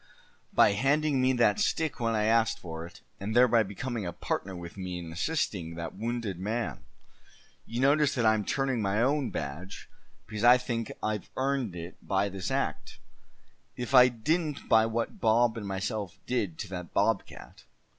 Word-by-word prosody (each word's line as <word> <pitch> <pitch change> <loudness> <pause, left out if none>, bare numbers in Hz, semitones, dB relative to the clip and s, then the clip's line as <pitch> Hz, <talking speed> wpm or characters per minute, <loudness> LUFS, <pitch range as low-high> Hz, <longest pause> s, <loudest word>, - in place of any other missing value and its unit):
"By - - +5
handing 140 +5 +2
me 130 0 +4
that 120 - +3
stick 160 -7 0
when 115 -1 0
I 105 - +1
asked 115 +1 +3
for 80 -1 -7
it, 85 - -16 0.2
and 105 +3 -4
thereby 120 -2 +6
becoming 110 +3 -4
a 85 - -3
partner 90 +2 -3
with 85 -1 -8
me 90 -2 -5
in 85 -2 -7
assisting 90 - -2
that 85 -1 -5
wounded 115 -4 -3
man. 110 +4 -2 0.9
You 120 +2 -3
notice 145 +1 +3
that 120 -3 +1
I'm 110 -1 +3
turning 135 +2 0
my 100 +1 0
own 140 0 +1
badge, 80 +7 -6 0.4
because 110 0 -5
I 120 +1 +8
think 115 -2 -3
I've 110 -1 -2
earned 130 -7 -1
it 85 +1 -8
by 100 +1 0
this 95 -2 -4
act, - - -2 0.8
if 125 +2 -5
I 125 -1 +9
didn't 150 +6 -1
by 110 0 +5
what 115 +1 -3
Bob 115 +1 +3
and 105 -3 -5
myself 95 -1 -3
did 100 -10 -1
to 105 - -5
that 90 -3 -7
bobcat. - - -1
110 Hz, 170 wpm, -29 LUFS, 95-125 Hz, 0.9 s, I